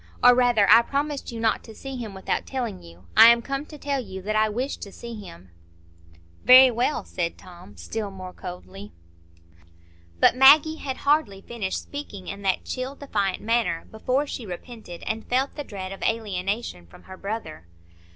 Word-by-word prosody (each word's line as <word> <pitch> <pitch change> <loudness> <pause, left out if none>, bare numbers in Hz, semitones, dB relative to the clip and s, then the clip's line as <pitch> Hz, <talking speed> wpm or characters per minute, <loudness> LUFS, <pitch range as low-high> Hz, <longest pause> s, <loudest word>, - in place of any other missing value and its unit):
Or 245 - +9
rather, 245 -5 +3
I 230 - +8
promised 280 +2 -3
you 230 - -6
not 225 -2 +1
to 220 - -12
see 270 +3 -7
him 225 -5 -6
without 190 - -3
telling 240 -7 -4
you. 85 +2 -16
I - - +10
am 235 0 +5
come 275 +2 -4
to 300 - -11
tell 280 -1 -2
you 190 -3 -8
that 215 +2 -2
I 215 0 +3
wish 250 +6 -3
to 200 - -9
see 235 +3 -9
him." 95 - -11 0.9
"Very 255 0 +9
well," 240 0 -1
said 170 -2 -3
Tom, 180 0 -14
still 220 -2 -4
more 185 -1 -9
coldly. 195 +3 -9 1.3
But - - +5
Maggie 290 +4 +7
had 265 -4 -5
hardly 285 -10 +2
finished 210 -5 -4
speaking 210 -10 -8
in 200 0 -6
that 190 -2 0
chill, 260 +2 -4
defiant 200 -10 -2
manner, 225 -7 0
before 255 +6 0
she 265 - -6
repented, 190 -1 -9
and 220 0 -4
felt 260 +3 +1
the 290 - -6
dread 190 -6 -7
of 195 - -9
alienation 200 - -2
from 85 - -17
her 190 - -11
brother. 195 - -6
220 Hz, 180 wpm, -25 LUFS, 190-255 Hz, 1.3 s, I